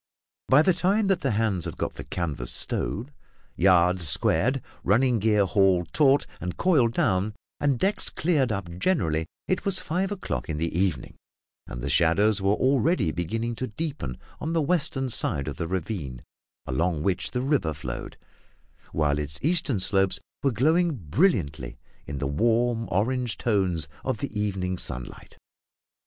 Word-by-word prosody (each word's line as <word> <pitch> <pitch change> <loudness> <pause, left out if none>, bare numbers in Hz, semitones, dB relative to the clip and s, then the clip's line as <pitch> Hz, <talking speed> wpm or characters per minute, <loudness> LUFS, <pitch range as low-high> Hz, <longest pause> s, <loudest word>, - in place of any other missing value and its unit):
By 135 +4 +6
the 185 - +4
time 190 +5 +1
that 190 -3 +2
the 135 - 0
hands 105 -6 0
had - - -6
got - - -2
the - - -8
canvas 75 -9 -2
stowed, 110 - +1 0.4
yards 90 -1 +4
squared, 115 - +2 0.2
running 120 +4 +3
gear 105 -1 +3
hauled 95 -4 +2
taut 140 -2 +4
and 90 0 -5
coiled 135 -11 +3
down, 95 +2 0 0.2
and 140 -3 +1
decks 195 - 0
cleared 150 -8 +1
up 100 -3 -3
generally, 80 - 0 0.2
it 185 - 0
was 195 -1 +2
five 185 +4 -2
o'clock 190 - -4
in 75 - -2
the 85 +1 -2
evening; 90 -8 -1 0.5
and - - -7
the - - -2
shadows 100 +5 +3
were 100 +2 +2
already 130 - +2
beginning 115 +9 -3
to 130 - -3
deepen 135 - -5 0.2
on 160 +2 -3
the 165 - +2
western 140 -5 0
side 70 -9 +2
of 70 - -5
the 85 - -3
ravine 80 - -4 0.4
along 80 +3 -1
which 95 0 0
the 125 - -2
river 135 - +1
flowed, 60 -5 -6 0.8
while 75 -2 +1
its 75 0 -3
eastern 155 - +1
slopes 95 0 +1 0.2
were 135 - +2
glowing 160 +7 +2
brilliantly 80 - 0 0.3
in 70 - -5
the 70 - -3
warm 115 - +1
orange 120 +4 0
tones 95 -9 0 0.2
of 130 -3 -1
the 140 +1 -5
evening 95 -3 -2
sunlight. - - -7
105 Hz, 155 wpm, -26 LUFS, 85-135 Hz, 0.8 s, By